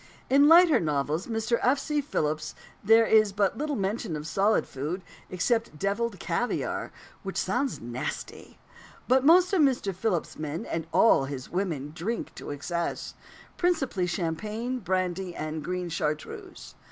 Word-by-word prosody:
In 275 +1 +6
the 290 - +7
lighter 335 0 +7
novels 150 +1 -1
of - - -6
Mr. 225 +1 0
F. 260 +3 +3
C. 300 +1 -1
Philips, 155 - -2 0.3
there 225 +2 +6
is 215 -2 +4
but 200 +2 0
little 300 0 -1
mention 195 -4 -2
of 150 0 -5
solid 195 +7 +2
food 155 +8 -5 0.3
except 225 0 0
devilled 200 +2 -1
caviare, 175 +10 -2 0.3
which 195 -1 -5
sounds 245 +8 -1
nasty; 120 +2 -6 0.5
but 260 +1 +4
most 355 +5 +6
of 370 - +4
Mr. 255 -8 +2
Philips's 185 -2 -2
men, 155 +1 -4
and 165 -1 -4
all 180 -11 +5
his 135 -2 -7
women, 165 -7 -2
drink 200 +8 -4
to - - -9
excess 170 +4 -3 0.4
principally 270 - +1
champagne, 210 +9 -3
brandy, 185 -2 -2
and 155 0 -4
green 180 +2 -3
chartreuse. 155 -2 -4
195 Hz, 150 wpm, -27 LUFS, 160-235 Hz, 0.5 s, the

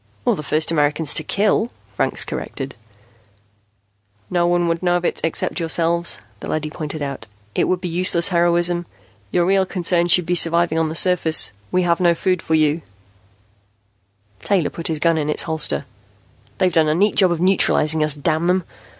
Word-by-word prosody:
"Or - - +2
the - - -6
first 155 +2 0
Americans 150 -1 +1
to 155 - -3
kill," 210 +6 0 0.2
Franks - - -1
corrected. 135 -1 -6 1.6
"No 175 -1 +1
one 175 0 +1
would 165 0 -1
know 175 -1 +1
of 175 - -5
it - - -1
except 165 +3 -1
yourselves," 170 +1 +1 0.2
the - - -8
leady 155 -1 -3
pointed 155 -1 -5
out. 140 -5 -6 0.3
"It - - +1
would 185 - 0
be 180 - -4
useless 170 0 +2
heroism. 175 -1 +2 0.4
Your 175 - +1
real 190 +1 +2
concern 175 -2 0
should 180 0 +4
be 175 - -1
surviving 170 -1 +1
on 160 -1 0
the 160 - -6
surface. 165 - +3 0.2
We 185 - +1
have 170 -1 +1
no 175 -2 +3
food 180 +1 -1
for 160 - -1
you, 155 -1 +4
you 145 - -1
know." - - -13 1.6
Taylor 190 -6 0
put 165 - -4
his 160 - -2
gun 165 +1 +1
in 150 0 -2
its 150 - +2
holster. 160 -3 +1 0.7
"They've 185 -2 +1
done 160 -1 +3
a 155 - +1
neat 200 +4 +2
job 185 -3 +4
of 170 - -2
neutralizing 160 -4 +2
us, 150 -1 +2
damn 160 +3 -1
them. 180 0 +1
170 Hz, 185 wpm, -19 LUFS, 155-180 Hz, 1.6 s, should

